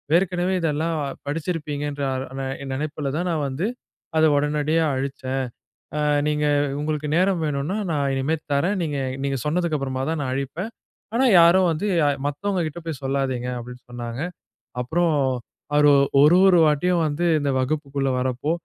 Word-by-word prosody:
ஏற்கனவே 180 0 +1
இதெல்லாம் 160 +1 0 0.3
படிச்சிருப்பீங்கன்ற 145 -2 -3
அ - - -2 0.2
நெ 135 - -2 0.3
நெனைப்பில 145 0 -3
தான், 180 +1 -1
நான் 150 -3 0
வந்து 140 +8 -2 0.5
அத 160 - +4
உடனடியா 150 +2 +1
அழிச்சேன். 135 -1 -2 0.5
ஆ - - 0 0.3
நீங்க 150 0 0 0.4
உங்களுக்கு 150 0 -2
நேரம் 185 -1 +2
வேணும்னா, 150 +5 -1
நான் 140 -3 0
இனிமே 140 +5 0 0.2
தர்றேன். 170 +9 +1
நீங்க 150 -4 -2 0.3
நீங்க 135 -1 0
சொன்னதுக்கு 170 0 +1
அப்புறமா 130 -1 -3
தான் 160 -2 -2
நான் 130 - -2
அழிப்பேன். 150 - -4 0.4
ஆனா 260 +3 +3 0.2
யாரும் 180 +2 +6
வந்து 160 +6 -2 0.4
மத்தவங்க 185 +7 -1
கிட்ட 155 +2 -6
போய் 155 -5 -4
சொல்லாதீங்க" 135 -2 -1
அப்படின்னு 125 +1 -9
சொன்னாங்க. 120 +2 -5 0.6
அப்புறோம் 160 +4 +1 0.6
அவரு 145 0 +6 0.3
ஒரு 160 +5 +7
ஒரு 180 -3 +6
வாட்டியும் 165 +3 +2
வந்து 155 +4 -1
இந்த 145 -1 0
வகுப்புக்குள்ள 140 0 -1
வர்றப்போ, 130 +4 -1
150 Hz, 145 wpm, -23 LUFS, 135-165 Hz, 0.6 s, ஒரு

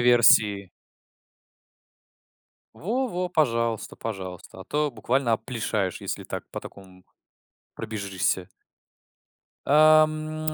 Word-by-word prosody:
версии. 110 -5 +5 2.1
Во 245 - -2
во, 180 -3 -3
пожалуйста, 115 - 0
пожалуйста, 95 -4 -7
а - - -9
то 150 +6 -1
буквально 120 +1 0
опплишаешь, 110 -4 -2
если - - -4
так - - -6
по - - -6
такому 95 -2 -14 0.7
пробежишься. 100 -4 -2 1.2
А, 155 +1 +7
м, 155 0 -5
115 Hz, 90 wpm, -25 LUFS, 100-155 Hz, 2.1 s, А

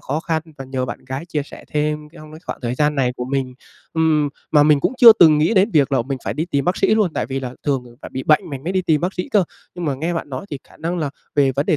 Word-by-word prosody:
khó 150 +4 -3
khăn 160 -2 -1 0.2
và 135 - -6
nhờ 130 -1 -3
bạn - - -7
gái 135 +5 -5
chia 150 -4 -2
sẻ - - -12
thêm 150 0 0
trong 155 -2 -13
cái 155 - -10
khoảng - - -5
thời 120 +1 -2
gian 150 +2 +1
này 125 -3 +1
của 125 - -3
mình. 130 -1 -2 0.4
Ừm, 155 -2 +2 0.2
mà 150 -2 +6
mình 150 -1 +4
cũng - - +1
chưa 235 -3 +11
từng 160 -8 +6
nghĩ 165 +9 +2
đến 200 +4 +4
việc 145 -4 +2
là 130 - +2
mình 135 +1 -4
phải - - -2
đi 155 - -1
tìm 140 -5 -1
bác 180 - +1
sĩ 215 - +3
luôn, 205 -7 +1
tại - - -1
vì 135 0 -3
là 125 -1 -6
thường 135 -4 0 0.2
phải - - -8
bị 130 - -3
bệnh 155 +1 +3
mình 140 0 -7
mới 180 - -2
đi 185 -1 +1
tìm 155 -4 +2
bác 180 +4 -2
sĩ 180 - -4
cơ. 200 -4 +3 0.3
Nhưng 175 -1 -5
mà 145 -3 0
nghe 165 +6 -2
bạn 165 - -4
nói 135 +8 -6
thì 145 - -4
khả - - -18
năng 170 +2 -3
là 145 -3 -2 0.2
về 140 -2 +3
vấn 140 +3 -1
đề 155 - +3
150 Hz, 305 wpm, -20 LUFS, 135-165 Hz, 0.4 s, chưa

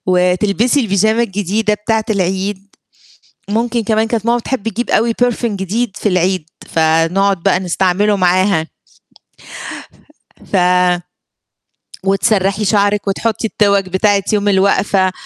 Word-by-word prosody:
وتلبسي 190 +8 +2
البيجامة 220 +1 +1
الجديدة 210 +1 -1
بتاعة 220 +1 -1
العيد، 195 0 -2 0.8
ممكن 230 +2 0
كمان 220 +1 +1
كانت 225 -1 -2
ماما 235 +1 +2
بتحب 230 -2 -3
تجيب 230 +3 -4
أوي 230 +1 +2
perfume 245 0 0
جديد 205 +1 -3
في - - -1
العيد، 185 -3 0 0.2
فنقعد 165 +4 +1
بقى 195 -2 +2
نستعمله 190 +3 +1
معاها. 185 -2 +2 1.9
ف 200 - +2 1.5
وتسرّحي 195 +1 +1
شعرِك 205 0 +1
وتحطي 220 +3 -1
التِوَك 200 -2 +1
بتاعة 195 +1 +1
يوم 205 -1 +1
الوقفة، 195 -1 +2
200 Hz, 110 wpm, -15 LUFS, 190-220 Hz, 1.9 s, وتلبسي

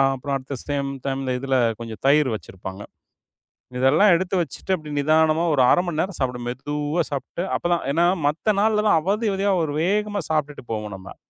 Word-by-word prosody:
அப்புறம் 140 +2 -3
அடுத்த 135 +1 -7
at - - -12
same 140 -1 -1 0.2
டைம்ல, 135 -1 -2
இதுல 135 0 -1 0.3
கொஞ்சம் 115 -2 -8
தயிர் 145 -1 +4
வச்சிருப்பாங்க. 95 -1 -8 0.9
இதெல்லாம் 150 +11 +5
எடுத்து 185 +2 -1
வச்சிட்டு, 165 +4 -5
அப்டி 155 -4 -9
நிதானமா 155 +2 +3
ஒரு 140 - +3
1/2 - - +5
மணி 160 -3 -2
நேரம் 190 0 -3
சாப்பிடணும். 125 -2 -2
மெதுவா 150 +5 -2
சாப்பிட்டு 140 +5 -4
அப்பதான், 175 -1 0
ஏன்னா 170 +3 +3 0.2
மத்த 165 +8 +1
நாளெல்லாம் 210 -4 +3
அவதி, 205 +7 0
அவதியா 195 +1 +1
ஒரு 150 -2 -2
வேகமா 205 +2 0
சாப்பிட்டுட்டு 150 -4 -2
போவோம் 105 -2 -4
நம்ம. 95 +1 -11
150 Hz, 170 wpm, -23 LUFS, 135-175 Hz, 0.9 s, இதெல்லாம்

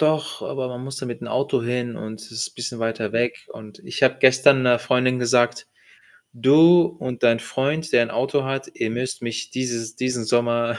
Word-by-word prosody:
Doch, 155 0 0
aber 130 -1 -4
man 125 0 -7
musste 135 0 -6
mit 120 -2 -6
'n - - -7
Auto 130 -1 0
hin 120 0 -3
und 110 0 -8
es 110 - -13
ist 115 +1 -4
bisschen 120 -1 -5
weiter 115 -1 -3
weg. 120 +1 -1
Und 110 -1 -13
ich - - -7
habe 130 0 +4
gestern 130 +1 +5
'ner 120 -1 +4
Freundin 125 0 +1
gesagt: 120 0 +1 0.7
„Du 160 +8 +6
und 125 -6 -6
dein 115 -1 +4
Freund, 150 +4 -2
der - - +5
ein 120 0 0
Auto 135 +3 -1
hat 135 0 -4
ihr - - -3
müsst 125 +3 -4
mich 115 -1 -5
dieses 115 -3 -4
diesen 125 -2 -2
Sommer 120 0 0
125 Hz, 195 wpm, -22 LUFS, 115-130 Hz, 0.7 s, Du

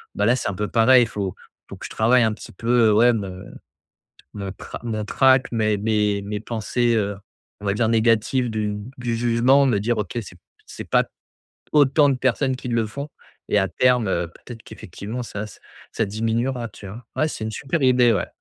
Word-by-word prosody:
bah, 105 - +1
là, 120 +4 +4
c'est 120 - -2
un - - -3
peu 105 +1 -2
pareil. 120 +1 +5
Faut 100 -4 -4 0.4
faut - - -9
que - - -9
je - - -7
travaille 120 +2 +3
un 110 -1 +1
petit - - -11
peu, 115 -1 +2
heu, 105 - +4
ouais 120 +3 +5
me, 95 -3 -5 0.9
me 100 -2 -5
tra 95 - -9
mon 110 -2 -3
trac, 130 +3 +3
mes 110 -2 +1
mes 105 -1 0
mes 105 +1 -4
pensées, 115 +2 -1
heu, 100 -2 -1 0.4
on 100 - -7
va 100 - +1
dire, 110 +1 +1
négatives 115 +2 +2
du 105 -1 -2 0.2
du 120 -2 -2
jugement, 120 +4 +3
me 115 -6 +2
dire: 115 +1 0
«OK, 105 +3 -3
c'est 90 - -12 0.3
c'est - - -9
pas - - +4 0.7
autant 145 0 +5
de 135 - +1
personnes 130 +1 0
qui 125 -1 -7
le 115 -2 +1
font» 140 +7 -7 0.4
et 105 - +4
à 95 - +1
terme, 125 -2 +2
heu, 85 -1 -1
peut-être 115 -2 -12
qu'effectivement 110 +3 -7
ça 105 -1 -6
ç - - -14 0.4
ça 115 - 0
diminuera, 115 +3 -2
tu 100 - -13
vois? 115 +5 -9
Ouais 155 - +1
c'est 110 - -6
une - - -3
super 135 +7 -3
idée, 125 -2 +5
ouais. - - -1
115 Hz, 205 wpm, -22 LUFS, 105-125 Hz, 0.9 s, pareil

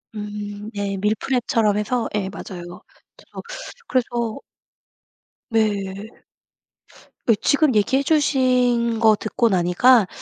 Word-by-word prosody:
음 210 0 -6
네. 200 -1 -2
밀프렙처럼 215 0 0
해서 230 +3 -1
예 195 -2 -1
맞아요. 175 -3 -9 0.4
저도 - - -11 0.5
그래서 235 -3 -1 1.1
네. 205 -3 -1 1.2
그 230 - +5
지금 285 +2 +2
얘기해 245 +6 +2
주신 250 -6 +2
거 220 -2 +5
듣고 220 +3 0
나니까 195 +4 +4
220 Hz, 195 characters per minute, -21 LUFS, 205-245 Hz, 1.2 s, 그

